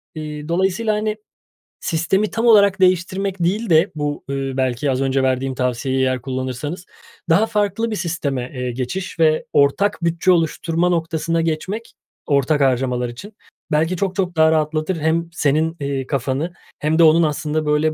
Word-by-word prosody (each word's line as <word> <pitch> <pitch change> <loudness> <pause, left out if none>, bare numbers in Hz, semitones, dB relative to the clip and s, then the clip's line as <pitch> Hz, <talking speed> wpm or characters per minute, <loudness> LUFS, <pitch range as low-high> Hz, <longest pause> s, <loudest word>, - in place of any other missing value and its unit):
Eee, 150 -1 -6
dolayısıyla, 190 +6 +1
hani, 210 0 -1 0.7
sistemi 180 +5 +1
tam 230 +1 -1
olarak 200 -4 +5
değiştirmek 185 +1 +1
değil 205 +6 0
de 165 +4 +4
bu, 145 -1 -3
eee, 135 -1 -2
belki 130 +2 0
az 130 0 -1
önce 135 0 +1
verdiğim 130 0 0
tavsiyeyi 130 +1 -1
eğer 130 -2 0
kullanırsanız, 130 +6 -4 0.4
daha 190 +7 +4
farklı 225 +1 -1
bir 215 - -1
sisteme, 140 -9 -3
eee, 125 -1 -3
geçiş 150 +9 -5
ve 155 -1 +3
ortak 145 +10 +2
bütçe 170 +2 +2
oluşturma 170 +1 +1
noktasına 165 -1 0
geçmek 175 +8 -3 0.3
ortak 140 0 +2
harcamalar 125 -2 +1
için. 200 - -10 0.4
Belki 160 +4 +1
çok 190 0 -1
çok 185 -3 -1
daha 160 0 +5
rahatlatır, 155 +2 0
hem 165 +2 0
senin, 160 +2 +1
eee, 140 -2 -3
kafanı 140 +5 -2 0.3
hem 155 +2 0
de - - +7
onun 165 +1 +6
aslında, 155 +1 -1
böyle, 150 +1 +2
160 Hz, 155 wpm, -20 LUFS, 135-185 Hz, 0.7 s, de